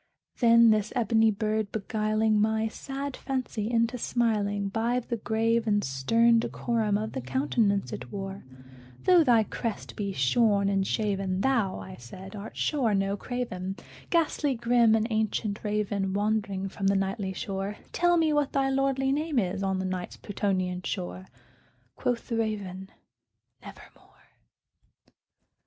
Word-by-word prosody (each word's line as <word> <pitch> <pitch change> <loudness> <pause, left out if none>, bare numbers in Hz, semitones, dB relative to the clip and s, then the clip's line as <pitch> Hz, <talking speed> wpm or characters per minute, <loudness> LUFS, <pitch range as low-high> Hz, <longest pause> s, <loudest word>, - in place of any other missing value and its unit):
Then 235 -1 +6
this 215 -1 +1
ebony 225 -2 +3
bird 215 0 -1
beguiling 215 0 +1
my 220 +1 +1
sad 275 +4 -5
fancy 255 -5 -3
into 235 +1 +1
smiling, 205 -4 0
By 230 +4 0
the 235 -1 -4
grave 225 +1 0
and 205 -1 +2
stern 230 - +3
decorum 225 -3 0
of 215 +1 -3
the - - -4
countenance 145 - 0
it 125 0 -7
wore, 195 0 -6 0.6
"Though 360 -2 +6
thy 235 -6 +5
crest 225 0 -5
be 200 -2 -2
shorn 200 - +2
and 195 -1 +1
shaven, 195 -3 -1
thou," 230 -6 +1
I 95 -1 -9
said, 185 - -10
"art 205 +1 -8
sure 250 -9 +1
no 195 0 0
craven, 195 -5 -4 0.3
Ghastly 310 -4 +1
grim 235 -1 +4
and 220 0 +1
ancient 215 -1 -1
Raven 205 -2 -1
wandering 205 -2 0
from 195 0 -3
the 195 - +3
Nightly 195 0 -1
shore, 195 +2 -4
Tell 350 0 +3
me 320 -2 +3
what 295 -1 +1
thy 270 -1 +2
lordly 270 0 +1
name 300 0 -1
is 190 -3 0
on 190 -1 0
the 190 - -2
Night's 185 -1 -4
Plutonian 185 -3 -2
shore!" 90 - -5 0.7
Quoth 245 -1 -2
the 230 - -2
Raven, 195 -4 -3 0.7
"Nevermore." - - -15
215 Hz, 145 wpm, -28 LUFS, 195-235 Hz, 0.7 s, Then